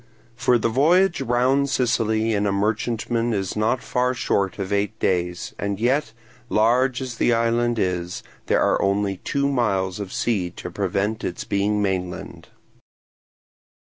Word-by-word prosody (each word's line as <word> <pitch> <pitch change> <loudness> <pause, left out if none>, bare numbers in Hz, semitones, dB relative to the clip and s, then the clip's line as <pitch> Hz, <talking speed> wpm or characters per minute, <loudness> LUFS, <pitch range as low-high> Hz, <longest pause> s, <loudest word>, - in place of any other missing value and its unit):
For 125 0 +3
the 115 - 0
voyage 165 +9 +3
round 130 +3 +2
Sicily 115 -3 +1
in 105 0 +1
a - - +1
merchantman 115 +3 -1
is 95 -3 -2
not 110 +4 0
far 125 +1 0
short 100 -5 0
of 100 0 -3
eight 100 -1 -1
days; 90 -1 -1
and 100 -1 -2
yet, 125 +2 +1 0.4
large 125 +4 +2
as 125 -3 -6
the 120 - +3
island 115 +1 +1
is, 90 -3 -2 0.2
there - - +3
are - - +2
only 100 0 0
two 140 +8 -1
miles 100 -8 0
of 100 -2 -5
sea 100 -7 0
to 90 - -7
prevent 100 +3 -1
its 90 - -3
being 105 0 0
mainland. 90 -2 -4
110 Hz, 145 wpm, -23 LUFS, 100-120 Hz, 0.4 s, For